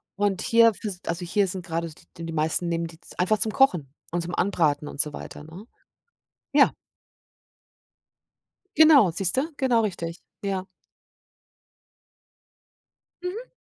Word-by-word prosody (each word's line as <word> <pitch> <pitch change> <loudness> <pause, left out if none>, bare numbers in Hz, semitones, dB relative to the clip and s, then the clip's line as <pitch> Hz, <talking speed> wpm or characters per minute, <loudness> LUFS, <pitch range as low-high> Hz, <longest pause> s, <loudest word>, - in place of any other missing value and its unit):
Und 200 -2 0
hier 230 -1 +5
fürs 200 -3 -5
Also, 170 +2 -3
hier 200 +3 +1
sind 185 0 -5
grade 165 0 -3
d 155 - -15 0.2
d 165 - -7
die 165 - -5
meisten 160 +2 0
nehmen 170 0 -1
die 165 0 -14
z - - -13
einfach 200 +4 +3
zum 215 +1 +1
Kochen 175 - +2 0.2
und 175 +1 -1
zum 175 - -6
Anbraten 155 -6 +1
und 145 - -9
so 150 -1 +1
weiter, 150 - -9
ne? 170 +7 -11 0.9
Ja. - - +6 2.1
Genau, 300 - +7
siehst 180 +6 0
du. 310 +5 0
Genau 245 -4 +3
richtig, 170 -5 -4 0.2
ja. 190 -1 -2 2.6
Mhm. 430 +8 -5
180 Hz, 140 wpm, -25 LUFS, 165-215 Hz, 2.6 s, Genau